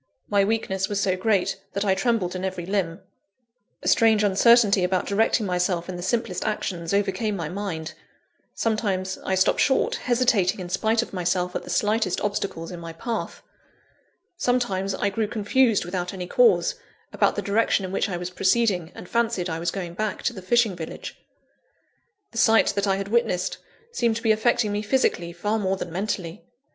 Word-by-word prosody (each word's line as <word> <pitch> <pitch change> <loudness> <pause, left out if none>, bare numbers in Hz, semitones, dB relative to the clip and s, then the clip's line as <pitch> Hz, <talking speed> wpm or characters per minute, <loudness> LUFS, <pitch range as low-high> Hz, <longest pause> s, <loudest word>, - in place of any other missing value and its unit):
My 200 -1 +3
weakness 195 -3 -1
was 205 -1 -1
so 190 -2 +1
great, 195 -1 0
that 200 +1 -1
I 195 - +3
trembled 195 -3 0
in 185 - -4
every 185 -2 -3
limb. 190 -2 -2 0.8
A - - -4
strange 220 -2 +4
uncertainty 205 0 +5
about 185 0 +1
directing 220 +2 +1
myself 180 -2 0
in 185 - -5
the 175 - -6
simplest 190 -1 -1
actions, 170 -5 -3
overcame 200 +1 0
my 165 -5 -4
mind. 175 -5 -4 0.6
Sometimes, 195 -4 -1
I 190 - 0
stopped 190 - +2
short, 265 - +2
hesitating 235 -7 +1
in 180 -1 -6
spite 220 +5 +1
of - - -12
myself 180 0 -1
at - - -1
the - - -11
slightest 210 -3 +1
obstacles 200 -5 -3
in 175 - -7
my 165 -1 -8
path. 225 +7 -5 0.9
Sometimes, 195 - 0
I 200 +1 0
grew 215 +2 -1
confused 220 0 +2
without 180 +1 -3
any 180 -1 -5
cause, - - +3 0.4
about - - +2
the - - -3
direction 205 -1 +1
in 185 - -6
which 195 - 0
I 180 - -2
was 175 +1 -5
proceeding, 185 -3 +1
and - - -9
fancied 225 -6 0
I 160 - -3
was 170 +1 -1
going 175 -2 -5
back 215 +3 -3
to 240 - 0
the 190 - -8
fishing 225 +1 +2
village.. 160 -2 -7 1.2
The 230 - -4
sight 225 -1 +5
that 200 0 -1
I 195 - +3
had 195 0 -4
witnessed, 210 -6 0 0.3
seemed 235 - +1
to 230 - -5
be 225 - +4
affecting 220 0 +2
me 205 0 -1
physically, 205 -7 0
far 205 +6 -1
more 190 -1 0
than 175 - -6
mentally. 185 -3 -4
195 Hz, 180 wpm, -24 LUFS, 180-220 Hz, 1.2 s, uncertainty